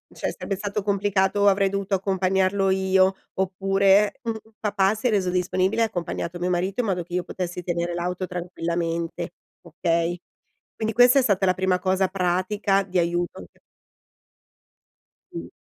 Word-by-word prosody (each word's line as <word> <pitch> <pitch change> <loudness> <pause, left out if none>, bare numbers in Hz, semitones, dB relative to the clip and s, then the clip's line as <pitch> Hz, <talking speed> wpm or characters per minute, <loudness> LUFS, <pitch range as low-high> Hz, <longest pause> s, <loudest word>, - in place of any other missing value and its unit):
cioè - - -2
sarebbe 195 - -4
stato 205 +2 -3
complicato, 200 0 +1
avrei 195 0 +4
dovuto 200 0 -3
accompagnarlo 190 0 +1
io, 190 0 +3 0.2
oppure, 195 +2 +2
un 230 -2 -2 0.2
papà 205 -1 +1
si 220 +4 -1
è - - +3
reso 195 -4 +1
disponibile 185 +4 0
e - - +6
ha 225 - +2
accompagnato 175 -2 -4
mio 180 +1 -1
marito 180 +4 -1
in 235 - +1
modo 180 -2 -1
che 175 - -14
io 180 0 0
potessi 180 0 -5
tenere 170 0 -2
l'auto 180 +2 -2
tranquillamente, 170 -1 -3 0.3
okay. 170 +1 -1 0.6
Quindi 220 0 -2
questa 245 +3 +6
è - - +4
stata 200 -5 +2
la 185 - +3
prima 185 0 0
cosa 190 0 +2
pratica 195 +2 0
di 185 -1 -2
aiuto 175 - -1
c - - -31 1.8
Mh. 85 0 -5
190 Hz, 160 wpm, -24 LUFS, 180-200 Hz, 1.8 s, e